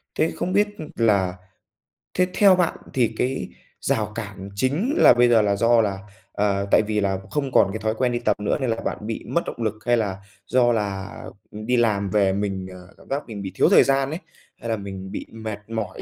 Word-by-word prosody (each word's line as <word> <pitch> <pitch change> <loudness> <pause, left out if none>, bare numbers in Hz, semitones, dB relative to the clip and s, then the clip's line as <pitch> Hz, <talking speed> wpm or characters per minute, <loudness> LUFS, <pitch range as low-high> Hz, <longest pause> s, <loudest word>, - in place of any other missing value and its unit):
Thế 160 - +1
không 185 - -2
biết, 205 +1 +4
ừm, 155 - -8
là 100 -6 +2 0.8
thế 180 0 +2
theo 200 -3 +6
bạn 180 -2 0 0.2
thì 120 -4 +1
cái 130 +2 -1 0.3
rào 110 -6 0
cản 100 -3 -6
chính 150 - 0
là - - +8
bây 120 0 +4
giờ 115 -2 +5
là 100 -1 +1
do 115 +2 +4
là, 100 -2 -1 0.3
ờ, 100 -1 0
tại - - +6
vì 105 0 -1
là 95 -1 0
không 140 -3 -1
còn 100 -5 +4
cái - - -4
thói 110 +1 -1
quen 125 +1 +1
đi 120 - -1
tập 120 - 0
nữa 105 - 0
nên 130 - 0
là 115 - +1
bạn - - -2
bị 110 +2 -5
mất 170 - +1
động 120 - -5
lực? 110 -2 0
Hay 120 -1 +3
là 100 -4 -1 0.3
do 120 0 +3
là, 100 -3 -2 0.4
ừm, 110 +1 -8
đi 125 +1 +2
làm 105 -4 +1
về 100 -1 +2
mình, 95 -2 -2
ờ, 90 0 -12
cảm - - -19
giác 140 +2 -1
mình 105 -4 -6
bị 95 -1 -5
thiếu - - +4
thời - - +7
gian 135 0 +1
ấy? 160 - -4 0.4
Hay 115 - -7
là 115 - 0
mình 95 -1 -7
bị - - -5
mệt 110 -2 -6
mỏi? 110 -3 -4
110 Hz, 230 wpm, -23 LUFS, 100-125 Hz, 0.8 s, là